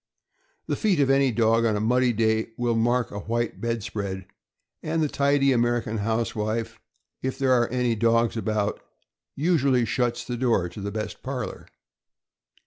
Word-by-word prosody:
The -, -, -1 dB
feet 200 Hz, -8 st, +1 dB
of 135 Hz, -1 st, +3 dB
any 135 Hz, -1 st, +3 dB
dog 115 Hz, 0 st, +3 dB
on 110 Hz, -2 st, +2 dB
a -, -, 0 dB
muddy 125 Hz, +3 st, +2 dB
day 110 Hz, 0 st, 0 dB
will 120 Hz, -1 st, 0 dB
mark 120 Hz, +1 st, +1 dB
a 100 Hz, -, -5 dB
white 115 Hz, +2 st, -2 dB
bed 115 Hz, -2 st, -2 dB
spread, 100 Hz, -4 st, -4 dB, 0.6 s
and 160 Hz, +1 st, -1 dB
the -, -, +2 dB
tidy 140 Hz, -1 st, +2 dB
American 120 Hz, -2 st, +1 dB
housewife, 110 Hz, 0 st, -2 dB, 0.4 s
if 130 Hz, 0 st, -3 dB
there 135 Hz, -2 st, +1 dB
are 120 Hz, -2 st, +3 dB
any 125 Hz, -1 st, 0 dB
dogs 115 Hz, +1 st, +2 dB
about, 110 Hz, -2 st, -1 dB, 0.5 s
usually 140 Hz, -6 st, +2 dB
shuts 120 Hz, +1 st, -1 dB
the 120 Hz, 0 st, -4 dB
door 115 Hz, -8 st, +1 dB
to 100 Hz, -, -9 dB
the 100 Hz, -, -3 dB
best 110 Hz, +1 st, -5 dB
parlor. 130 Hz, -1 st, -5 dB
115 Hz, 160 wpm, -25 LUFS, 110-130 Hz, 0.6 s, of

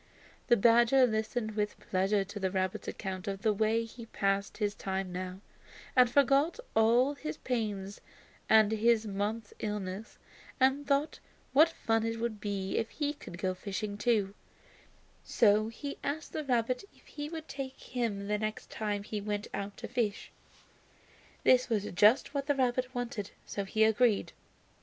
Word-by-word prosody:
The 240 Hz, -, +5 dB
badger 235 Hz, +4 st, +6 dB
listened 220 Hz, 0 st, -1 dB
with 210 Hz, -1 st, -2 dB
pleasure 195 Hz, +2 st, +1 dB
to 200 Hz, +2 st, -8 dB
the 190 Hz, -1 st, 0 dB
rabbit's 185 Hz, 0 st, -2 dB
account 190 Hz, -2 st, -5 dB
of 195 Hz, 0 st, -4 dB
the 215 Hz, -, +3 dB
way 220 Hz, +2 st, +1 dB
he 230 Hz, 0 st, -11 dB
passed 195 Hz, -1 st, -1 dB
his 205 Hz, -2 st, 0 dB
time 190 Hz, -1 st, -3 dB
now, 185 Hz, +1 st, -5 dB, 0.5 s
and 250 Hz, -2 st, +6 dB
forgot 280 Hz, -, +3 dB, 0.2 s
all 235 Hz, +5 st, +4 dB
his 305 Hz, +1 st, -6 dB
pains 205 Hz, -5 st, -3 dB, 0.5 s
and 220 Hz, -1 st, +6 dB
his 225 Hz, 0 st, +3 dB
month's 205 Hz, +2 st, -3 dB
illness, 210 Hz, 0 st, -4 dB, 0.4 s
and 270 Hz, +2 st, +3 dB
thought 285 Hz, +2 st, +1 dB, 0.3 s
what 310 Hz, +4 st, +7 dB
fun 225 Hz, -8 st, 0 dB
it 225 Hz, 0 st, -2 dB
would 225 Hz, -3 st, -3 dB
be 195 Hz, -2 st, -2 dB
if 225 Hz, -, -2 dB
he 295 Hz, -1 st, -2 dB
could 175 Hz, -, -10 dB
go 185 Hz, +1 st, -1 dB
fishing 200 Hz, +2 st, -4 dB
too; 210 Hz, -2 st, +1 dB, 0.9 s
so 215 Hz, -1 st, +3 dB
he 280 Hz, +5 st, -6 dB
asked 300 Hz, +3 st, -3 dB
the 310 Hz, -, -2 dB
rabbit 250 Hz, -, 0 dB
if -, -, -24 dB
he 295 Hz, 0 st, -6 dB
would 320 Hz, -1 st, -7 dB
take 270 Hz, -1 st, -6 dB
him 220 Hz, -5 st, -3 dB
the 210 Hz, 0 st, 0 dB
next 215 Hz, 0 st, -4 dB
time 205 Hz, -2 st, -2 dB
he 210 Hz, 0 st, -4 dB
went 205 Hz, 0 st, -3 dB
out 200 Hz, 0 st, -4 dB
to -, -, -6 dB
fish. 215 Hz, -4 st, -2 dB, 1.1 s
This 255 Hz, 0 st, +5 dB
was 215 Hz, -4 st, +1 dB
just 215 Hz, +11 st, +4 dB
what 280 Hz, -1 st, -2 dB
the 290 Hz, -, +2 dB
rabbit 255 Hz, 0 st, 0 dB
wanted, 240 Hz, -5 st, -3 dB, 0.2 s
so 200 Hz, -, -4 dB
he 215 Hz, +3 st, +2 dB
agreed. 220 Hz, 0 st, +3 dB
220 Hz, 160 wpm, -31 LUFS, 200-250 Hz, 1.1 s, what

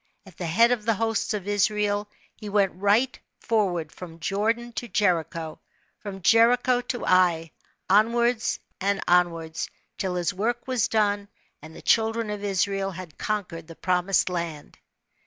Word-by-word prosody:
At 190 Hz, -4 st, -15 dB
the 175 Hz, -, -4 dB
head 230 Hz, +9 st, +4 dB
of 240 Hz, -4 st, 0 dB
the 225 Hz, 0 st, +1 dB
hosts 225 Hz, 0 st, -1 dB
of 200 Hz, -2 st, -6 dB
Israel 205 Hz, 0 st, +1 dB, 0.3 s
he 210 Hz, -, -8 dB
went 200 Hz, -2 st, +2 dB
right 205 Hz, +8 st, +2 dB, 0.2 s
^orward 180 Hz, -8 st, 0 dB
from 165 Hz, -2 st, -10 dB
Jordan 225 Hz, +6 st, -1 dB
to 240 Hz, -, -4 dB
Jericho, 170 Hz, -6 st, -1 dB, 0.4 s
from 195 Hz, -3 st, -8 dB
Jericho 245 Hz, +4 st, +4 dB
to 245 Hz, 0 st, -4 dB
Ai, 175 Hz, -3 st, +3 dB, 0.4 s
onwards 230 Hz, +3 st, +2 dB, 0.2 s
and 200 Hz, +1 st, 0 dB
onwards, 165 Hz, -2 st, +1 dB, 0.3 s
till 185 Hz, -2 st, -1 dB
his 175 Hz, -1 st, 0 dB
work 235 Hz, +6 st, -2 dB
was 255 Hz, -3 st, +1 dB
done, 205 Hz, -2 st, +1 dB, 0.3 s
and 160 Hz, +2 st, -12 dB
the -, -, -12 dB
children 225 Hz, -1 st, +2 dB
of 205 Hz, -1 st, -5 dB
Israel 195 Hz, 0 st, 0 dB
had 180 Hz, -4 st, -10 dB
conquered 180 Hz, -6 st, -3 dB
the 165 Hz, -, -11 dB
Promised 180 Hz, +1 st, +1 dB
Land. 170 Hz, -4 st, -5 dB
200 Hz, 150 wpm, -25 LUFS, 180-225 Hz, 0.4 s, head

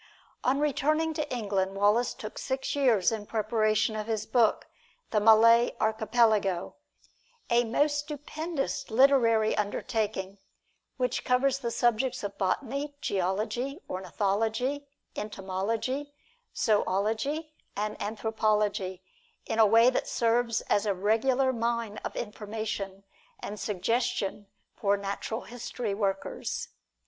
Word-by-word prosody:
On 265 Hz, +2 st, +2 dB
returning 305 Hz, +2 st, +1 dB
to 300 Hz, -1 st, -3 dB
England, 200 Hz, -5 st, -1 dB
Wallace 210 Hz, +5 st, +2 dB
took 215 Hz, -, -7 dB
six 265 Hz, +1 st, -2 dB
years 240 Hz, -10 st, +3 dB
in 215 Hz, -2 st, -4 dB
preparation 215 Hz, 0 st, +1 dB
of 215 Hz, 0 st, -4 dB
his 220 Hz, -2 st, -1 dB
book, 230 Hz, -2 st, +2 dB, 0.5 s
"The 215 Hz, -, +3 dB
Malay 230 Hz, +2 st, +6 dB
Archipelago," 220 Hz, -4 st, +2 dB, 0.8 s
a 240 Hz, +1 st, +4 dB
most 290 Hz, +6 st, +1 dB
stupendous 300 Hz, +1 st, -4 dB
literary 230 Hz, -3 st, +4 dB
undertaking, 205 Hz, -2 st, -2 dB, 0.6 s
which 250 Hz, -1 st, -1 dB
covers 265 Hz, +2 st, +2 dB
the 240 Hz, -3 st, -2 dB
subjects 240 Hz, +1 st, +1 dB
of 200 Hz, -1 st, -4 dB
botany, 275 Hz, +9 st, -1 dB
geology, 215 Hz, -, -1 dB
ornithology, 220 Hz, +9 st, -1 dB, 0.3 s
entomology, 215 Hz, +8 st, -3 dB, 0.5 s
zoology 220 Hz, -, 0 dB, 0.2 s
and 210 Hz, +1 st, -2 dB
anthropology, 210 Hz, -3 st, -1 dB, 0.4 s
in 225 Hz, -, -2 dB
a 220 Hz, -, +7 dB
way 230 Hz, +4 st, +6 dB
that -, -, -1 dB
serves 230 Hz, 0 st, +1 dB
as 205 Hz, +1 st, 0 dB
a 200 Hz, -, +1 dB
regular 250 Hz, +7 st, +2 dB
mine 235 Hz, -2 st, -2 dB
of -, -, -6 dB
information 210 Hz, -2 st, -5 dB, 0.4 s
and 210 Hz, +1 st, -6 dB
suggestion 205 Hz, 0 st, -1 dB, 0.3 s
for 200 Hz, 0 st, +1 dB
natural 200 Hz, +3 st, -4 dB
history 235 Hz, -2 st, -5 dB
workers. 195 Hz, -1 st, -2 dB
225 Hz, 110 wpm, -28 LUFS, 205-255 Hz, 0.8 s, a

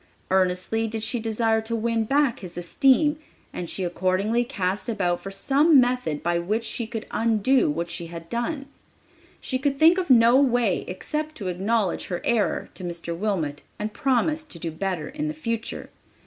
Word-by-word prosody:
Earnestly 190 Hz, +4 st, +1 dB
did 220 Hz, 0 st, -4 dB
she 240 Hz, +2 st, -1 dB
desire 225 Hz, 0 st, +1 dB
to 225 Hz, +1 st, -3 dB
win 230 Hz, 0 st, 0 dB
back 280 Hz, 0 st, +2 dB
his 175 Hz, -2 st, -9 dB
esteem, 270 Hz, -, +3 dB, 0.3 s
and 175 Hz, -2 st, -5 dB
she 190 Hz, -, -3 dB
accordingly 185 Hz, +6 st, +1 dB
cast 205 Hz, -5 st, -2 dB
about 180 Hz, -6 st, 0 dB
for 195 Hz, -, -6 dB
some 280 Hz, +9 st, +4 dB
method 245 Hz, -, 0 dB
by 170 Hz, 0 st, +1 dB
which 210 Hz, +7 st, -1 dB
she 230 Hz, -1 st, -3 dB
could 225 Hz, -1 st, -5 dB
undo 230 Hz, -, +2 dB
what 170 Hz, +3 st, -2 dB
she 170 Hz, 0 st, -4 dB
had 165 Hz, 0 st, -9 dB
done. 275 Hz, -, -2 dB, 0.7 s
She 255 Hz, -, -3 dB
could 275 Hz, +1 st, 0 dB
think 330 Hz, +5 st, +6 dB
of 360 Hz, -, -3 dB
no 235 Hz, 0 st, +7 dB
way 245 Hz, -7 st, +2 dB
except 305 Hz, +12 st, -3 dB
to 195 Hz, -8 st, -4 dB
acknowledge 195 Hz, +2 st, 0 dB
her 175 Hz, -, -3 dB
error 230 Hz, -4 st, +1 dB
to 185 Hz, -, -7 dB
Mr. 170 Hz, -1 st, -4 dB
Wilmot 165 Hz, -7 st, -2 dB, 0.2 s
and 210 Hz, 0 st, -4 dB
promise 275 Hz, +6 st, +1 dB
to 235 Hz, -, -7 dB
do 165 Hz, 0 st, -4 dB
better 180 Hz, -1 st, -3 dB
in 300 Hz, +3 st, -4 dB
the 305 Hz, -, -4 dB
future. 230 Hz, -6 st, -4 dB
225 Hz, 175 wpm, -25 LUFS, 180-255 Hz, 0.7 s, no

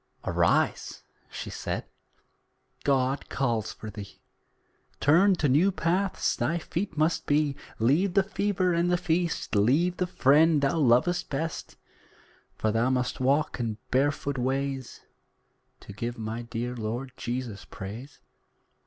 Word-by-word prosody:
"Arise," -, -, +1 dB, 0.3 s
she -, -, -6 dB
said -, -, -4 dB, 1.0 s
"God 135 Hz, 0 st, +1 dB
calls 115 Hz, -5 st, -1 dB
for 110 Hz, -, -8 dB
thee, 100 Hz, -1 st, -10 dB, 0.8 s
Turned 180 Hz, +6 st, +5 dB
to 150 Hz, -, +1 dB
new 155 Hz, +9 st, +4 dB
paths 185 Hz, +2 st, 0 dB
thy 170 Hz, -, 0 dB
feet 170 Hz, +1 st, -4 dB
must 155 Hz, +2 st, +1 dB
be. 145 Hz, -1 st, +2 dB, 0.2 s
Leave 155 Hz, -, +2 dB
the 195 Hz, -, +5 dB
fever 190 Hz, -2 st, 0 dB
and 170 Hz, +1 st, +1 dB
the 175 Hz, -, +3 dB
feast 170 Hz, -1 st, -1 dB
Leave 145 Hz, -, +3 dB
the 180 Hz, -, 0 dB
friend 150 Hz, -1 st, +4 dB
thou 140 Hz, +4 st, +2 dB
lovest 135 Hz, +6 st, +3 dB
best: 155 Hz, +3 st, -4 dB, 0.8 s
For 110 Hz, -, 0 dB
thou 115 Hz, +3 st, +2 dB
must 125 Hz, -1 st, -1 dB
walk 140 Hz, +3 st, +1 dB
in 115 Hz, -3 st, -2 dB
barefoot 140 Hz, 0 st, +1 dB
ways, 135 Hz, 0 st, -2 dB, 0.8 s
To 100 Hz, -, -10 dB
give 120 Hz, +4 st, -4 dB
my 110 Hz, +1 st, -4 dB
dear 120 Hz, +1 st, -4 dB
Lord 120 Hz, +4 st, -4 dB
Jesus 120 Hz, -4 st, -4 dB
praise." 115 Hz, +9 st, -9 dB
140 Hz, 130 wpm, -27 LUFS, 120-170 Hz, 1.0 s, Turned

